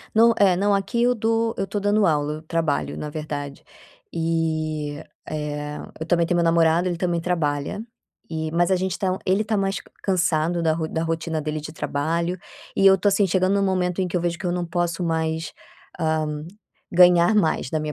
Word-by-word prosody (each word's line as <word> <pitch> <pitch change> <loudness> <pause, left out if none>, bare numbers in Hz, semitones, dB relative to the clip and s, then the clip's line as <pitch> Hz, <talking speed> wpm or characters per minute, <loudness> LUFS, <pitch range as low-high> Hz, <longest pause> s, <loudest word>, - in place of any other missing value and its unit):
Não. 230 +1 +6
É, 190 -3 +5
não, 205 +2 +2
aqui 200 +5 0
eu 245 +1 +4
dou 225 0 0
eu 195 - -1
tô 205 +2 -3
dando 205 +1 +2
aula, 150 -1 +1
eu 155 - -8
trabalho, 160 -2 -1
na 150 - -5
verdade. 145 -2 -6 0.5
E, 155 -2 -1 0.3
eh, 150 -1 -4 0.2
eu 160 - -4
também 170 -1 +2
tenho 175 - +1
meu 170 - +2
namorado, 165 +1 +3
ele 175 - -2
também 175 -1 -1
trabalha 165 +1 -1 0.5
e 160 -1 -3
mas 175 +2 +2
a 190 - +4
gente 185 -1 -2
tá 185 -1 0
ele 195 +3 +2
está 220 0 -2
mais 195 0 0
c - - -5 0.2
cansado 175 -2 +1
da 160 - +3
ro 160 0 -2
da 160 - -2
rotina 165 -1 -2
dele 155 0 -3
de 155 +1 -8
trabalho 165 +4 -2 0.4
e 195 - +4
eu 190 0 +8
tô 205 - +2
assim, 200 0 +3
chegando 185 +2 +2
num 200 - +2
momento 185 -1 0
em 185 - 0
que 180 - -2
eu 175 - +1
vejo 170 -1 -1
que 185 - -4
eu 175 - 0
não 175 0 -1
posso 175 0 -1
mais, 160 -1 -1 0.5
ah, 160 -1 +1 0.7
ganhar 180 +2 +6
mais 160 -9 +1
da 160 - 0
minha 155 0 -3
170 Hz, 210 wpm, -23 LUFS, 155-190 Hz, 0.7 s, eu